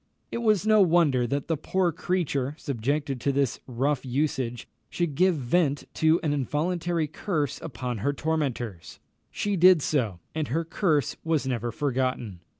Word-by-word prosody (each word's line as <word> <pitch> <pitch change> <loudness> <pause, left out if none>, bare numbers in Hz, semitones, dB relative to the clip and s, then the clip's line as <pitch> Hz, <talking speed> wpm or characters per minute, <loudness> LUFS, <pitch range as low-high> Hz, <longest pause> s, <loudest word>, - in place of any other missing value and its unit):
It - - -2
was 215 -4 +2
no 215 -1 +5
wonder 160 -9 +3
that 140 +3 -2
the 165 - +1
poor 175 +4 0
creature, 150 -5 -1
subjected 140 0 -2
to 140 - +1
this 140 -2 0
rough 135 +3 0
usage, 130 -3 -2 0.2
should 170 -4 -1
give 180 +5 +3
vent 145 +2 +1
to 160 +2 +3
an 150 -2 +1
involuntary 165 +4 -1
curse 150 0 -2
upon 125 -5 -4
her 140 +8 +1
tormentors. 135 - -3 0.3
She 205 -1 -1
did 180 -3 +6
so, 115 - 0
and 155 -2 -2
her 165 +6 -1
curse 160 -4 0
was 160 -4 0
never 120 -2 -2
forgotten. 130 - -2
145 Hz, 150 wpm, -26 LUFS, 130-165 Hz, 0.3 s, did